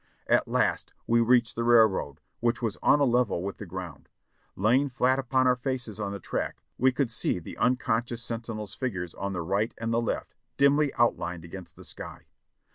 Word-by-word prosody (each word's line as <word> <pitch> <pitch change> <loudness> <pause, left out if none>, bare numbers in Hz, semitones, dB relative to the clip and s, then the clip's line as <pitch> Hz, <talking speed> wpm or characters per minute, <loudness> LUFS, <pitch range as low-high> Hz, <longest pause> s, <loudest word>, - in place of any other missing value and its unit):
At - - +3
last - - 0
we 115 0 +3
reached 120 0 +3
the 115 - -1
railroad, 110 -11 +3 0.2
which 120 +1 +1
was 115 -4 -2
on 145 - +5
a - - +4
level 120 -8 +2
with 100 0 -4
the 105 - -8
ground. 85 -5 -8 0.5
Lying 125 +8 +3
fiat 130 +1 +2
upon 130 0 +1
our 125 0 +4
faces 125 -4 -3
on 100 -1 -2
the 100 - -5
track, - - -4 0.2
we 130 +1 +5
could 125 -2 -1
see 115 - 0
the 85 - -8
unconscious 120 -1 0
sentinels' 115 -3 -5
figures 90 -10 -4
on 100 0 -4
the 85 -2 -3
right 100 +6 -1
and 115 0 -2
the 115 - +2
left 115 - -3 0.2
dimly 140 +1 +4
outlined 85 -7 0
against 90 +1 -10
the - - -13
sky. - - -8
115 Hz, 190 wpm, -27 LUFS, 100-125 Hz, 0.5 s, on